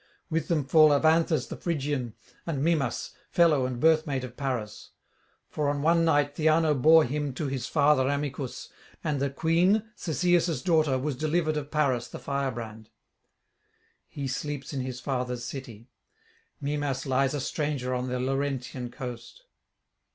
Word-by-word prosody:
With 165 +1 0
them 155 -5 0
fall 155 +2 +6
Evanthes 160 +2 +3
the - - -6
Phrygian, 145 -8 -2 0.3
and 145 -4 -1
Mimas, 150 -7 0 0.2
fellow 155 -7 +3
and 125 -2 -5
birthmate 155 -3 +2
of 125 -1 -8
Paris; 125 -7 -4 0.5
for 150 -2 -1
on 145 0 -2
one 165 +1 +4
night 145 -3 +2
Theano 155 0 +3
bore 155 +4 +6
him 145 0 -3
to 155 - -3
his 135 -2 -3
father 145 -3 +3
Amycus, 140 -2 -4 0.3
and 145 -3 -1
the 140 - +1
queen, 170 +9 +2
Cisseus' 175 0 +1
daughter, 155 -7 +3
was 140 +1 -2
delivered 155 +2 0
of 145 -1 -4
Paris 140 -6 0
the - - -8
firebrand; 120 -6 -4 1.2
he 140 -2 -5
sleeps 140 +1 -4
in 135 - -2
his 130 -1 -5
fathers' 125 -2 -3
city; 120 -2 -8 0.7
Mimas 140 -2 -2
lies 135 +1 +1
a - - -2
stranger 140 -2 -2
on 125 0 -2
the 125 0 -2
Laurentian 130 -1 -2
coast. 125 - -8
140 Hz, 145 wpm, -27 LUFS, 130-155 Hz, 1.2 s, fall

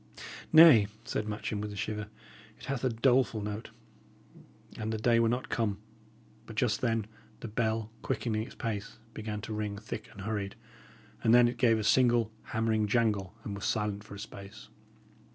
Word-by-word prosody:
"Nay," 155 -10 +9 0.2
said 105 - -2
Matcham, 105 0 -3
with 105 0 -4
a - - -7
shiver, 105 +1 -3 0.5
"it - - -12
hath 135 -2 -3
a 130 - +3
doleful 120 0 +2
note. 105 +2 -5 1.1
An 110 0 -2
the 110 - -1
day 115 +1 +3
were 115 -1 +3
not 125 +2 -2
come" 110 -4 0 0.7
But 110 - -9
just 110 -1 +1
then 115 -3 +1 0.4
the - - -5
bell, 110 0 -1
quickening 110 -3 -1
its 115 - -8
pace, 105 -4 -4 0.2
began 105 -1 -5
to 110 - -5
ring 105 -1 -3
thick 110 0 -7
and 100 - -10
hurried, 100 -1 -3 0.7
and 115 +1 +6
then 120 -1 +7
it 120 - -3
gave 115 -3 +4
a 110 - -2
single 120 -1 +4
hammering 110 -1 0
jangle, 105 -3 +1
and 105 - -5
was 100 - -5
silent 105 -1 -1
for 105 - -10
a - - -9
space. 100 +1 -10
110 Hz, 175 wpm, -30 LUFS, 105-115 Hz, 1.1 s, Nay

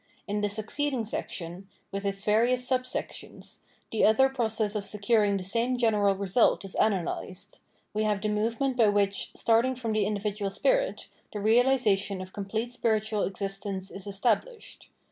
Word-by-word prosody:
In 205 0 -1
the 205 - +1
succeeding 230 +4 -1
section, 185 -2 -5 0.2
with 195 +1 -4
its 195 0 -2
various 245 +4 +2
subsections, 255 -1 -4 0.3
the 225 - +1
other 265 +5 +5
process 220 -5 0
of 210 -2 -2
securing 205 0 +1
the 190 - -5
same 235 +6 0
general 210 -4 +3
result 195 +2 +2
is 195 - -7
analysed: 195 0 -2 0.3
we 215 - 0
have 210 -2 +1
the 215 - -2
movement 230 +5 0
by 225 -3 +5
which, 200 -1 +1
starting 235 +3 +2
from 230 -3 -3
the 210 -2 +1
in 210 - -1
dividual 205 0 -2
spirit, - - 0 0.3
the 210 - -3
realisation 215 -3 +3
of 185 0 -8
complete 220 +4 -3
spiritual 220 -3 0
existence 195 0 -4
is 195 +1 -9
established. 230 - -2
210 Hz, 155 wpm, -28 LUFS, 200-235 Hz, 0.3 s, other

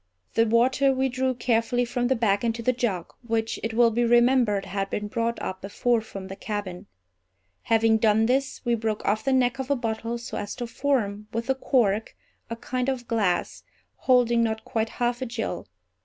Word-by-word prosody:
The 225 0 +3
water 255 +4 +3
we 265 0 +1
drew 255 +1 -1
carefully 240 +1 +1
from 245 0 -1
the 265 - +2
bag 210 -3 +1
into 230 0 -1
the 255 - +2
jug; 215 -8 -2
which, 225 -2 -2
it 225 0 -3
will 235 0 +5
be 240 +2 +1
remembered, 240 -4 +3
had 195 +1 -3
been 210 0 -3
brought 230 +2 -2
up 185 - -5
before 230 +4 0
from 195 -3 -8
the 190 - -7
cabin. 205 -4 -5 0.8
Having 225 0 +3
done 220 0 +3
this, 265 +2 -1
we 240 - +2
broke 220 -2 -2
off 215 +2 +1
the 270 - +1
neck 260 0 +2
of 265 0 -4
a 280 - +3
bottle 230 -1 -3
so 235 - -6
as 205 0 -5
to 240 - -4
form, 225 -5 -1
with 230 +1 -3
the 265 - +2
cork, 225 -6 0 0.3
a 230 - -3
kind 250 +2 -2
of 250 -3 -3
glass, 205 -6 0 0.4
holding 240 -2 +3
not 220 -1 -1
quite 225 0 -1
half 240 +1 -2
a 260 - -2
gill. 225 -5 -4
230 Hz, 195 wpm, -25 LUFS, 220-245 Hz, 0.8 s, will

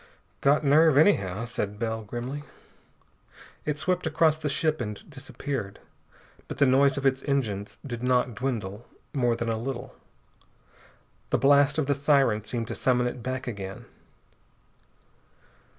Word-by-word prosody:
"Got 145 +2 +3
nerve, 155 +1 +5
anyhow," 115 - +3
said 105 -3 -4
Bell 110 0 -2
grimly. 120 +6 -5 1.2
It 150 -1 -1
swept 180 +1 0
across 155 0 +3
the 155 -1 -3
ship 155 +1 0
and 105 -3 -6
disappeared, 135 -5 -5 0.7
but - - -6
the 140 - +5
noise 135 +1 +4
of 140 - -3
its 135 0 +2
engines 110 -8 -1
did 120 -4 -5
not 125 -1 +1
dwindle 115 -3 -4 0.3
more 120 -4 +2
than 115 - -3
a 110 -1 -1
little. 125 0 -5 1.4
The - - +2
blast 140 +2 +4
of 155 - +1
the 140 - +2
siren 140 -6 +2
seemed 115 +1 -4
to - - -3
summon 125 -1 +1
it 125 0 -3
back 130 +2 -4
again. 100 -5 -6
130 Hz, 140 wpm, -27 LUFS, 115-140 Hz, 1.4 s, nerve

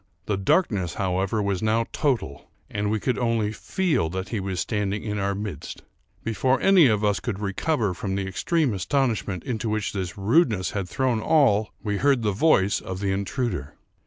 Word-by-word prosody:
The 105 - 0
darkness, 95 - +1
however, 95 +2 0
was 100 -2 -1
now 110 +1 +2
total; 125 - -1 0.2
and 105 0 -1
we 110 +1 0
could 125 +4 -1
only 115 -3 +1
feel 155 - 0
that 95 +2 -4
he 115 - -2
was 95 -2 -3
standing 105 -1 -1
in 105 -1 -3
our 100 0 0
midst. 100 -7 -6 0.4
Before 130 +4 +1
any 190 -4 +6
one 125 - +5
of 105 0 0
us 100 -1 +2
could 100 - -4
recover 105 - 0
from 95 +2 -3
the 100 0 -2
extreme 130 - 0
astonishment 105 - -1
into 115 -2 -3
which 110 -1 -1
this 95 -2 -4
rudeness 105 - +2
had 95 -3 -3
thrown 130 -4 0
all, 110 -8 +3
we 105 -2 -1
heard 135 0 +2
the 105 - +2
voice 100 -3 +3
of 95 0 -6
the 100 -1 0
intruder. 95 - -2
105 Hz, 185 wpm, -25 LUFS, 95-120 Hz, 0.4 s, any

